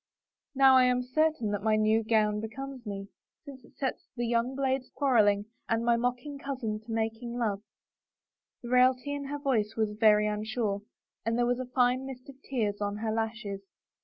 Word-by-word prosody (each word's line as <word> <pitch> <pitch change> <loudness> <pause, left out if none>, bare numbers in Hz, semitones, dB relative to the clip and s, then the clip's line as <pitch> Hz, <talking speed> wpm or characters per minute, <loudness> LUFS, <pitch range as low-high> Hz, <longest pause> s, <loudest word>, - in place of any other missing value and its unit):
" - - -64
Now 265 -1 +7
I 255 - +6
am 250 0 +2
certain 295 -3 +1
that 205 -1 -2
my 215 +1 +2
new 215 +1 +3
gown 215 -1 +2
becomes 250 +3 -7
me, 195 -1 -5 0.4
since 270 -3 -11
it - - -21
sets 265 -2 -3
the 240 - -1
young 235 +2 0
'blades 265 -1 -1
quarreling 210 -7 +3 0.2
and 225 +1 +1
my 235 0 +4
mocking 250 +4 -2
cousin 250 -7 -3
to 220 +1 -11
making 225 +2 -2
love 210 -5 0
I - - -50 0.5
" - - -60
The 240 - -6
raillery 255 +2 +3
in 285 -1 -4
her 290 +1 -4
voice 230 -7 0
was 220 -1 +1
very 210 0 +4
unsure, 210 -1 -1 0.4
and 230 +1 0
there 240 - +2
was 245 +1 0
a 255 - -3
fine 250 +1 +1
mist 255 -1 -9
of 270 0 -13
tears 215 -7 -2
on 205 0 -2
her 220 0 -2
lashes. 220 -3 -3
235 Hz, 195 wpm, -29 LUFS, 215-260 Hz, 0.5 s, Now